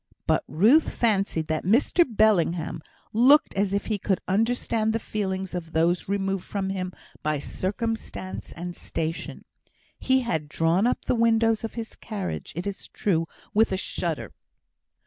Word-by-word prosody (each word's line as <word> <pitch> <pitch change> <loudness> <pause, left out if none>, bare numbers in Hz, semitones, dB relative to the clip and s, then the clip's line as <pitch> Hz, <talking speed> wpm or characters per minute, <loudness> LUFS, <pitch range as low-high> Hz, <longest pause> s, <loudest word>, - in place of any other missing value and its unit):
But - - +2
Ruth 220 - +4
fancied 200 -8 +1
that 155 0 -2
Mr 245 - +4
Bellingham 180 -8 +2 0.3
looked 275 +8 +5
as 195 0 0
if 200 0 -1
he 215 -2 -1
could 190 -1 0
understand 220 +1 +1
the 225 - 0
feelings 190 -3 -3
of 165 -2 -5
those 170 +3 +1
removed 195 -1 -1
from 195 -2 -3
him 185 -1 -3 0.3
by 155 0 0
circumstance 195 +4 -3
and 175 +1 -6
station. 160 +1 -4 0.5
He 260 0 +3
had 160 -11 -2
drawn 165 +7 +2
up 250 - -1
the - - +2
windows 225 -1 +3
of 225 - -5
his 230 -1 -6
carriage, 200 -5 -5
it 175 +3 -4
is 200 -1 -5
true, 165 -5 0 0.3
with 220 0 +4
a 190 - 0
shudder. 170 -4 -3
195 Hz, 150 wpm, -26 LUFS, 175-225 Hz, 0.5 s, looked